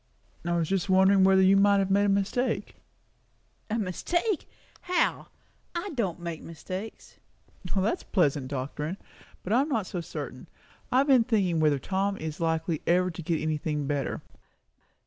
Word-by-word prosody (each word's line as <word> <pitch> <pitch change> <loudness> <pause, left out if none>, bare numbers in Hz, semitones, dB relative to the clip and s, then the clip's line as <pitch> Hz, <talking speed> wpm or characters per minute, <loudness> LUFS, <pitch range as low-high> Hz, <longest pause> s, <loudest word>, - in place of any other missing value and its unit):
"Just 190 +3 -1
wondering 190 +1 +5
whether 190 0 +5
you 190 +1 +6
might 200 0 +5
have 195 -1 +1
made 200 +1 +4
a - - +2
mistake." 200 +2 0 0.9
"A 220 - 0
mistake! 340 - -1 0.3
How? 360 -1 0 0.5
I 365 +4 -3
don't 195 - -1
make 170 -2 -5
mistakes." 185 +6 -8 0.6
"That's 195 +3 +1
pleasant 145 -8 +1
doctrine! 145 +6 -4 0.5
But 195 - -1
I 245 - +5
am 290 - -2
not 225 -8 0
so 180 -1 -4
certain. 170 - -7 0.4
I 250 - +3
have 275 +2 +4
been 260 -4 +6
thinking 195 -8 +1
whether 150 -2 +3
Tom 195 +7 -1
is 155 -1 -5
likely 160 -1 0
ever 180 +1 +3
to 170 - -7
get 165 -1 -1
anything 150 -1 -1
better." 140 -1 -2
190 Hz, 150 wpm, -28 LUFS, 160-205 Hz, 0.9 s, you